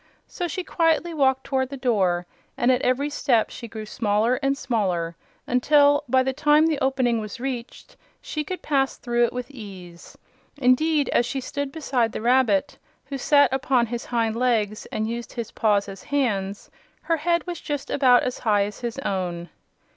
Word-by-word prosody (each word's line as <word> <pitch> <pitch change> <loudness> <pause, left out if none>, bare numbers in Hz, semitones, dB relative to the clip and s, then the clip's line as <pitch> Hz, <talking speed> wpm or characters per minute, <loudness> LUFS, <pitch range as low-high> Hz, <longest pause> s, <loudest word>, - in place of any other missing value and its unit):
So 355 - -4
she 360 +3 -4
quietly 330 0 +1
walked 265 -3 +2
toward 260 -2 -1
the 275 - -6
door, 190 -9 +1 0.3
and 245 - +3
at 255 0 +2
every 275 +4 0
step 250 -6 +1
she 235 - -8
grew 220 -1 -7
smaller 215 +3 +1
and 275 0 +1
smaller 185 -11 -1 0.3
until, 285 +3 +4
by 260 +1 +4
the 265 0 -1
time 300 +2 +4
the 315 -3 +1
opening 260 -3 +1
was 215 +3 -7
reached, 250 -2 -6 0.2
she 305 - -4
could 365 +5 -6
pass 270 -3 0
through 240 0 +1
it - - -3
with 250 +2 -6
ease. 190 -8 -11 0.4
Indeed, 285 +2 +3
as 240 - +2
she 270 - -3
stood 285 +1 -4
beside 260 -7 -1
the - - -3
rabbit, 240 -5 +2 0.3
who 275 -1 -6
sat 285 -1 +4
upon 260 -2 +2
his 240 +1 -5
hind 230 -2 0
legs 225 -4 0
and 215 0 -3
used 235 +1 -5
his 235 -2 -5
paws 210 -2 +1
as 195 -1 -9
hands, 210 -9 -2 0.3
her 330 - +1
head 340 +1 0
was 350 -1 -5
just 290 -2 -4
about 250 -3 +5
as 250 - -3
high 210 -3 +2
as 205 +1 -6
his 240 0 -4
own. 175 -3 -3
250 Hz, 180 wpm, -24 LUFS, 220-280 Hz, 0.4 s, about